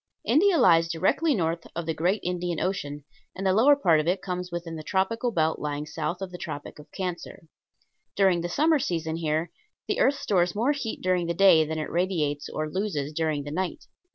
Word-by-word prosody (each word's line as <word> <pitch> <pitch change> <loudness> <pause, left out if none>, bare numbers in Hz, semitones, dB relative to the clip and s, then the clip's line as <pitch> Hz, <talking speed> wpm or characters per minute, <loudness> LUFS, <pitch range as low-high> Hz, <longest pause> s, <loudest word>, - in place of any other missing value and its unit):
India 370 +3 +4
lies 165 - +5
directly 235 - +1
north 165 -3 -2
of 170 0 -3
the 160 - -1
great 180 +6 0
Indian 175 -1 -2
Ocean, 145 -6 -3 0.3
and 195 - -5
the 190 - +3
lower 260 +8 +6
part 170 - +3
of 155 - -2
it 185 +2 +1
comes 180 -1 -4
within 170 -1 -5
the 155 - -6
tropical 200 +8 0
belt 160 -7 0
lying 150 0 -3
south 175 +4 -4
of 185 - -6
the 180 - -8
Tropic 145 +1 -7
of 150 - -14
Cancer. 180 -4 -5 0.7
During 190 -3 +3
the 175 - -3
summer 310 - +3
season 165 -7 -2
here 160 +1 -1 0.4
the - - -1
earth 280 - +4
stores 180 -9 0
more 235 +7 +2
heat 275 -6 -4
during 180 -2 +1
the 170 - -1
day 170 -4 +6
than 160 +1 -4
it 155 - -4
radiates 165 -5 -1
or 155 0 -3
loses 155 -5 -3
during 155 -2 -1
the 145 - -7
night. 190 - -3
175 Hz, 205 wpm, -26 LUFS, 160-195 Hz, 0.7 s, lower